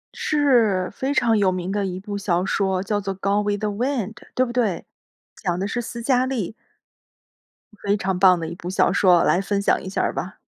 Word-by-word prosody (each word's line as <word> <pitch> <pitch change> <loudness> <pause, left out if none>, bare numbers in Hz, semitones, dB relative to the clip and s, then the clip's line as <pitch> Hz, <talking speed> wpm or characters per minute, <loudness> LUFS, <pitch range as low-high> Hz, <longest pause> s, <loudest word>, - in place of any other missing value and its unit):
是， 235 -11 +2
非 265 +6 -3
常 240 -5 +3
有 195 -3 +3
名 185 +1 -3
的 205 -1 -1
一 185 0 -5
部 205 +1 -6
小 180 -2 0
说 190 -2 0
叫 205 0 -1
做 195 0 -4
《Gone 200 +2 +1
with 205 0 -1
the 210 - 0
Wind》 225 0 -2 0.2
对 255 - +3
不 240 - -6
对？ 225 -7 0 0.5
讲 175 -2 -2
的 195 - -1
是 240 +3 -2
思 235 0 -7
嘉 255 0 +2
丽。 230 -7 -3 1.3
非 200 0 +1
常 190 -2 -1
棒 185 -2 +5
的 165 - -4
一 170 - -6
部 175 0 -7
小 185 - +2
说， 180 -3 +4
来 175 - +3
分 200 0 -1
享 - - +2
一 190 - -7
下 190 - -1
儿 - - 0
吧。 - - -5
200 Hz, 290 characters per minute, -22 LUFS, 185-230 Hz, 1.3 s, 棒